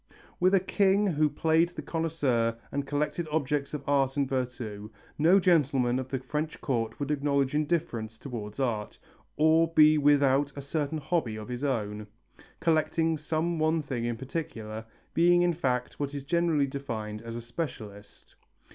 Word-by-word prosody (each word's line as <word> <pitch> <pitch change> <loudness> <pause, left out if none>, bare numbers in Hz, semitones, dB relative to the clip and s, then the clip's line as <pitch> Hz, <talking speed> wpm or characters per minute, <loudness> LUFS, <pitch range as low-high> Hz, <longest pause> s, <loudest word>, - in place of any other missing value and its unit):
With 185 +2 +4
a - - +5
king 195 +2 +2
who 155 -5 +2
played 160 +3 +2
the 175 - -8
connoisseur 140 -9 0
and 140 0 -3
collected 150 +3 -1
objects 145 -2 0
of 145 - -6
art 135 -1 +2
and 140 -1 +2
virtu, 120 -5 -4 0.3
no 175 +6 +6
gentleman 140 -8 +2
of 130 0 -5
the 135 - -1
French 150 +5 -4
court 115 -4 -2
would 145 0 -2
acknowledge 140 -2 +1
indifference 150 -8 -1
towards 110 -4 -7
art, 115 -6 -2 0.4
or 160 +2 +4
be 155 -1 +6
without 140 -1 +3
a 140 - -5
certain 150 +1 -2
hobby 145 -6 -1
of 110 +2 -8
his 125 +2 -4
own, 105 -6 -2 0.5
collecting 160 0 +2
some 160 +2 -1
one 160 +1 +2
thing 135 -6 -3
in 120 -1 -2
particular, 115 -6 -5 0.3
being 175 +1 +4
in 175 -1 +2
fact 125 -7 -2
what 145 0 -3
is 140 - -4
generally 165 -2 +2
defined 115 -6 -5
as 115 0 -7
a 120 - -4
specialist. 110 -6 -7
140 Hz, 160 wpm, -28 LUFS, 120-160 Hz, 0.5 s, no